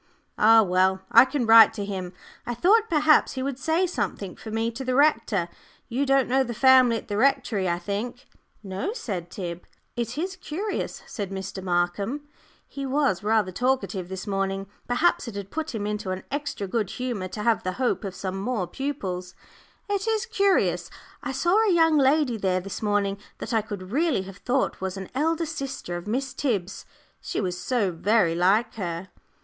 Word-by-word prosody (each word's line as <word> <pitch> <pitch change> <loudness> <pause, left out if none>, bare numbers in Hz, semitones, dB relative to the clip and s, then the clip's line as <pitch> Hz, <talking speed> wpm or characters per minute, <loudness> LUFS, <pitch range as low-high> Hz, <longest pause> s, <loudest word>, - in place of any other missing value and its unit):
"Ah 225 +1 +7
well! 190 0 +2
I 235 +3 +9
can 265 -2 -1
write 225 0 +8
to 205 - -3
him. 190 -3 -4 0.4
I 240 - -2
thought 430 - +4
perhaps 305 -1 +4
he 260 -1 -3
would 270 -1 -3
say 325 +6 +1
something 200 - -3
for 220 - -10
me 225 +1 -1
to 245 +4 -6
the 255 -1 -1
rector 255 - +2 0.4
you 265 +4 0
don't 270 -1 +3
know 265 +2 +3
the 240 -2 -5
family 255 -2 +6
at - - -9
the 205 - -2
Rectory, 250 -7 +2
I 170 - 0
think?" 210 +8 -5 0.4
"No," 195 - -3
said 195 - -5
Tib. 175 -2 -5 0.3
"It 240 +2 -3
is 375 +4 -3
curious," 380 +5 -4
said 200 -3 -5
Mr. 190 0 -5
Markham 190 +10 -1 0.4
he 275 - -7
was 270 -8 +1
rather 210 -2 +1
talkative 235 -5 -1
this 190 0 -5
morning; 195 -1 -2 0.2
perhaps 315 +4 +2
it 230 - -7
had 200 -1 -6
put 315 -5 -4
him 205 -2 -3
into 210 -2 -3
an 185 0 -3
extra 285 -7 -3
good 205 0 -1
humour 240 -7 -3
to 210 +3 -6
have 230 -1 +2
the 185 - -3
hope 250 0 -1
of 195 -2 -5
some 190 0 -4
more 215 -3 -1
pupils 185 -8 -4 0.5
"it 405 0 -1
is 445 0 +1
curious 400 -4 +1 0.3
I - - -4
saw 340 +8 +1
a 430 - +3
young 325 -3 +4
lady 270 -3 +3
there 185 -3 +1
this 195 +1 -7
morning 205 -2 0 0.2
that 230 - -5
I 225 - +3
could 205 -3 -8
really 290 - +1
have 195 0 -10
thought 255 0 -1
was 190 0 -3
an 190 -1 -7
elder 320 +5 0
sister 275 - -5
of 175 +3 -6
Miss 255 +4 -2
Tib's 200 -9 -2 0.3
she - - -3
was 180 -3 -1
so 200 +2 0
very 185 +1 +2
like 190 +7 +2
her." 175 -1 -4
225 Hz, 190 wpm, -25 LUFS, 190-275 Hz, 0.5 s, I